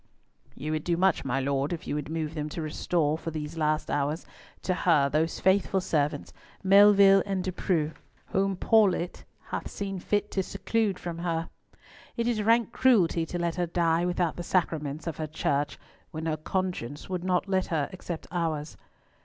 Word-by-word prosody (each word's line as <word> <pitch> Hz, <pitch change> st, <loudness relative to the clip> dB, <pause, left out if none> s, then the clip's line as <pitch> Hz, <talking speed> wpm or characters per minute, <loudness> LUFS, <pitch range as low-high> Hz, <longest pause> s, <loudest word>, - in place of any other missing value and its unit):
"You 155 Hz, +2 st, -4 dB
would 155 Hz, -1 st, -1 dB
do 170 Hz, -1 st, 0 dB
much, 190 Hz, -1 st, +2 dB
my 135 Hz, 0 st, 0 dB
Lord, 140 Hz, +2 st, 0 dB
if 170 Hz, -, -4 dB
you -, -, -3 dB
would 150 Hz, 0 st, -3 dB
move 160 Hz, -1 st, -3 dB
them 150 Hz, -1 st, -3 dB
to 165 Hz, -, -5 dB
restore—for 155 Hz, +1 st, -1 dB
these 155 Hz, 0 st, -5 dB
last 155 Hz, -1 st, 0 dB
hours—to 150 Hz, +5 st, -3 dB
her 165 Hz, -5 st, +3 dB
those 155 Hz, +3 st, 0 dB
faithful 190 Hz, 0 st, +3 dB
servants, 150 Hz, -5 st, -1 dB, 0.3 s
Melville 195 Hz, 0 st, +7 dB
and 195 Hz, -2 st, -2 dB
De 185 Hz, -, -2 dB
Preaux, 165 Hz, -4 st, 0 dB, 0.4 s
whom 195 Hz, 0 st, +1 dB
Paulett 190 Hz, -5 st, +2 dB, 0.3 s
hath -, -, -4 dB
seen 195 Hz, -2 st, -4 dB
fit 205 Hz, +3 st, -1 dB
to 190 Hz, -, 0 dB
seclude 210 Hz, +1 st, -1 dB
from 170 Hz, -1 st, -6 dB
her. 165 Hz, -1 st, -2 dB, 0.7 s
It 235 Hz, 0 st, 0 dB
is 230 Hz, -3 st, +1 dB
rank 230 Hz, +2 st, +3 dB
cruelty 185 Hz, -12 st, +3 dB
to 175 Hz, -, -4 dB
let 170 Hz, -1 st, -1 dB
her 175 Hz, -1 st, 0 dB
die 170 Hz, 0 st, +1 dB
without 175 Hz, -2 st, 0 dB
the -, -, -3 dB
sacraments 155 Hz, -5 st, -1 dB
of 165 Hz, -3 st, -4 dB
her 155 Hz, -, -3 dB
Church 145 Hz, -1 st, -1 dB, 0.3 s
when 160 Hz, 0 st, -6 dB
her 160 Hz, -1 st, 0 dB
conscience 155 Hz, -5 st, -3 dB
will 185 Hz, -2 st, -2 dB
not 185 Hz, +1 st, +1 dB
let 190 Hz, -1 st, +1 dB
her 155 Hz, -4 st, 0 dB
accept 175 Hz, -3 st, -6 dB
ours." 160 Hz, -3 st, -2 dB
170 Hz, 175 wpm, -28 LUFS, 155-190 Hz, 0.7 s, Melville